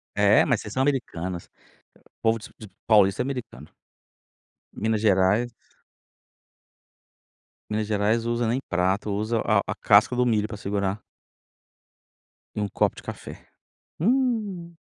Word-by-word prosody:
É - - +5
mas - - +1
vocês 105 - -8
são 130 - 0
americanas, 95 - -2 0.7
povo 115 0 +2
de 110 - -12
de 110 - -10 0.2
paulista 100 -4 +4
é - - -4
americano. 125 - -7 1.0
Minas 110 0 -1
Gerais 105 +3 +3 2.2
Minas 105 0 -1
Gerais 110 +2 +1
usa 120 0 0
nem 120 +4 0
prato, 95 +4 0
usa 110 +3 -1
a 110 - +3
a - - -3
casca 105 +4 +4
do 125 0 +2
milho 110 -3 +1
para 105 - -7
segurar 100 0 -2 1.5
e - - -3
um 105 - 0
copo - - 0
de - - -11
café, - - -9 0.5
hum. 215 -6 0
110 Hz, 130 wpm, -25 LUFS, 100-120 Hz, 2.2 s, É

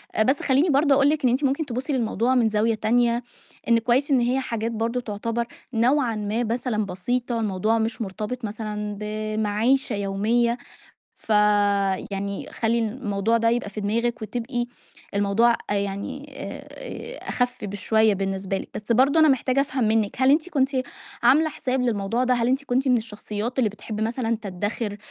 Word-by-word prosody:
آآ 220 - +4
بس 265 +5 +2
خلّيني 280 +6 +3
برضو 285 +1 +4
أقول 275 +1 +4
لِك 300 -2 0
إن 250 - +5
أنتِ 255 +5 0
ممكن 280 +3 +1
تبُصّي 260 +3 -3
للموضوع 240 0 +1
من 230 -3 +4
زاوية 220 +1 +1
تانية، 235 +2 +2 0.4
إن 230 -1 +5
كويس 250 +5 +1
إن 265 - +5
هي 245 +2 +1
حاجات 230 -3 -2
برضه 230 +2 -1
تعتبر 230 +2 -3 0.3
نوعًا 245 +1 +2
ما 215 +3 -1
مثلًا 230 -2 -1
بسيطة 235 +6 -2
الموضوع 215 +1 +1
مش 225 +1 -2
مُرتبط 215 +4 -4
مثلًا 210 -1 -4
بمَعيشة 215 +3 0
يومية، 215 +4 +1 0.6
ف - - -15 0.8
يعني 200 0 -4
خلّي 230 +1 +1
الموضوع 220 -2 0
ده 230 0 +2
يبقى 230 -3 0
في 210 - -6
دماغِك 230 +3 -1
وتبقى 240 +2 -3 0.5
الموضوع 205 +4 +3 0.2
أ - - +1
يعني 200 +9 -4
آآ - - -7
آآ - - -8
أخف 245 -2 -1
بشوية 210 +2 +2
بالنسبة 195 0 -2
لِك، - - -8
بس 215 +2 -2
برضو 270 +6 +4
أنا 315 -1 +6
محتاجة 265 0 +2
أفهم 260 -3 0
منِك 215 -1 +1
هل 260 - +6
أنتِ 310 +4 +3
كنتِ 275 -5 +1 0.5
عاملة 280 +7 +5
حساب 260 -3 -2
للموضوع 230 0 0
ده؟ 255 0 +3
هل 235 -1 +1
أنتِ 265 +2 +1
كنتِ 265 0 0
من 250 - +5
الشخصيات 220 +2 -4
اللي 225 -5 +3
بتحب 210 +1 -7
مثلًا 230 +1 0
تدَّخر 205 +2 -3
230 Hz, 170 wpm, -24 LUFS, 210-255 Hz, 0.8 s, أنا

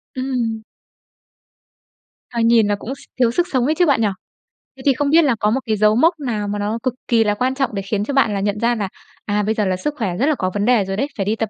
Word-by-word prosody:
Ừm. 245 -4 -2 1.7
Ờ, 235 - -4
nhìn 230 -2 +4
là 205 - +1
cũng 250 +6 -6
s - - -18 0.2
thiếu 235 -2 +4
sức 350 +6 0
sống 255 -3 +1
ấy 310 - +1
chứ 355 +2 +3
bạn 275 -7 +2
nhỉ? 215 - +3 0.7
Thế 260 - -11
thì 275 - +5
không 280 +2 -1
biết 330 +2 +5
là 265 -5 +2
có 210 - +2
một 255 +5 +1
cái 220 - 0
dấu 215 +1 +4
mốc 330 +6 +3
nào 225 -7 -3
mà 205 0 -3
nó 210 +3 -1
cực 255 -2 0
kỳ 230 -2 +3
là 210 -1 +1
quan 260 +4 0
trọng 270 -5 -1
để 195 - -2
khiến 200 +1 -2
cho 280 - -4
bạn 250 -6 +3
là 200 - -1
nhận 205 +1 -1
ra 240 +1 +2
là, 205 -4 -3 0.4
à, 210 0 0
bây 220 +2 0
giờ 210 -2 0
là 185 - 0
sức 295 +10 -3
khỏe 190 -7 -2
rất 255 - +1
là 305 -1 +2
có 185 - -1
vấn 205 0 -1
đề 240 -5 +4
rồi 195 0 -4
đấy, 275 +6 0
phải 195 - -1
đi 215 +3 0
tập 225 -2 -2
225 Hz, 285 wpm, -19 LUFS, 205-265 Hz, 1.7 s, thì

